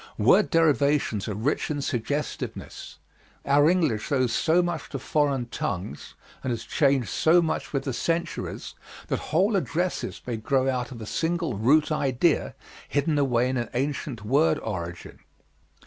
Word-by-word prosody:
Word - - +4
derivations 145 -9 +2
are 105 - -3
rich 120 +9 -1
in 150 -1 -2
suggestiveness. 140 +3 -4 0.5
Our 145 +2 +5
English 160 - +1
owes 130 -4 +2
so 170 +2 +3
much 175 -2 -3
to - - -4
foreign 140 -4 0
tongues 90 -11 -5 0.3
and 130 - -2
has 120 -2 -2
changed 135 -5 +1
so 165 +2 +4
much 160 -2 -1
with 135 -2 -1
the 135 - -3
centuries 165 +7 -3 0.4
that - - 0
whole 195 +7 +2
addresses 180 -1 -1
may 120 -2 -3
grow 130 +4 +1
out 125 -2 -1
of 120 - -8
a - - -6
single 165 +4 -1
root 145 +10 +3
idea 140 +2 +1 0.3
hidden 145 +1 +1
away 125 -3 +2
in 130 0 -1
an 120 - -2
ancient 135 -4 -3
word 140 +8 +3
origin. 85 -5 -6
140 Hz, 150 wpm, -26 LUFS, 120-160 Hz, 0.5 s, Our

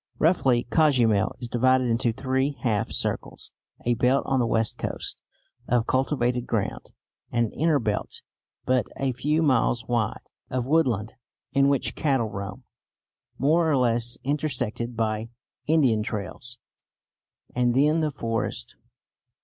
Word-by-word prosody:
Roughly 135 -7 +3
Cozumel 125 - +3
is 120 - -6
divided 130 +2 +3
into 120 0 +1
three 130 +3 -1
half 110 -4 0
circles; - - -3 0.3
a 120 - +3
belt, 125 +4 +2
on 135 -1 +1
the 120 - +2
west 115 -1 0
coast, - - -4 0.5
of 120 -1 +2
cultivated 125 -2 0
ground; 105 -4 -2 0.4
an 115 -2 +1
inner 155 0 +2
belt, 110 -5 -3 0.4
but 130 -1 +2
a 135 -1 0
few 150 +6 0
miles 125 -4 +2
wide, 120 -3 -1 0.2
of 125 -1 -1
woodland 125 -8 +1 0.4
in 140 0 +4
which 140 -1 +1
cattle 135 -7 0
roam, 100 0 -6 0.7
more 160 +4 +3
or 145 - +3
less 120 -1 +1
intersected 125 -5 -2
by 110 0 -1 0.4
Indian 135 -9 +3
trails; 105 +3 -5 1.0
and 120 -1 +1
then 150 +4 +4
the 155 - +1
forest. 115 -5 -3
125 Hz, 130 wpm, -25 LUFS, 115-140 Hz, 1.0 s, in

